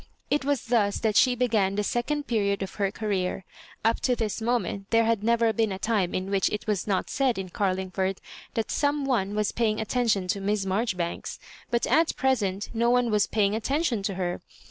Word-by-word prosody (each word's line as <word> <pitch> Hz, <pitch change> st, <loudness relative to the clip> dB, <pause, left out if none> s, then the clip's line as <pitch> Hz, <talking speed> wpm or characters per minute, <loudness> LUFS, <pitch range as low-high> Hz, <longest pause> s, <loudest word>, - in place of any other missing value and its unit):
It 290 Hz, -1 st, +2 dB
was 280 Hz, -2 st, 0 dB
thus 220 Hz, -4 st, +2 dB
that 220 Hz, -2 st, +1 dB
she 250 Hz, +2 st, +5 dB
began 220 Hz, -6 st, +1 dB
the 210 Hz, -, 0 dB
second 285 Hz, +7 st, -1 dB
period 200 Hz, -5 st, 0 dB
of 190 Hz, -, -6 dB
her 195 Hz, -, +3 dB
career. 195 Hz, -3 st, -2 dB, 0.4 s
Tip 225 Hz, +1 st, +2 dB
to 250 Hz, -, +1 dB
this 225 Hz, -1 st, -2 dB
moment 215 Hz, -4 st, -1 dB
there 230 Hz, 0 st, +4 dB
had 225 Hz, -2 st, +1 dB
never 230 Hz, 0 st, +3 dB
been 220 Hz, -1 st, +1 dB
a 190 Hz, -, -3 dB
time 200 Hz, -3 st, 0 dB
in 190 Hz, +1 st, -3 dB
which 195 Hz, -2 st, +2 dB
it 210 Hz, -, -4 dB
was 210 Hz, -3 st, -1 dB
not 195 Hz, -3 st, 0 dB
said 260 Hz, -5 st, +1 dB
in 190 Hz, -1 st, -4 dB
Carlingford 190 Hz, 0 st, -1 dB, 0.4 s
that 225 Hz, -1 st, -1 dB
some 290 Hz, -1 st, +1 dB
one 210 Hz, -7 st, 0 dB
was 210 Hz, -1 st, +1 dB
paying 220 Hz, -2 st, 0 dB
attention 220 Hz, -4 st, 0 dB
to 200 Hz, -, 0 dB
Miss 200 Hz, 0 st, 0 dB
Marjorifianks; 190 Hz, -3 st, -2 dB, 0.3 s
but 235 Hz, -1 st, +1 dB
at 325 Hz, +1 st, +2 dB
present 210 Hz, -7 st, 0 dB
no 235 Hz, +1 st, +2 dB
one 245 Hz, -1 st, +3 dB
was 210 Hz, -1 st, +3 dB
paying 205 Hz, -2 st, +1 dB
attention 250 Hz, +1 st, 0 dB
to 195 Hz, -1 st, -2 dB
her. 180 Hz, -1 st, -2 dB
215 Hz, 200 wpm, -26 LUFS, 195-235 Hz, 0.4 s, she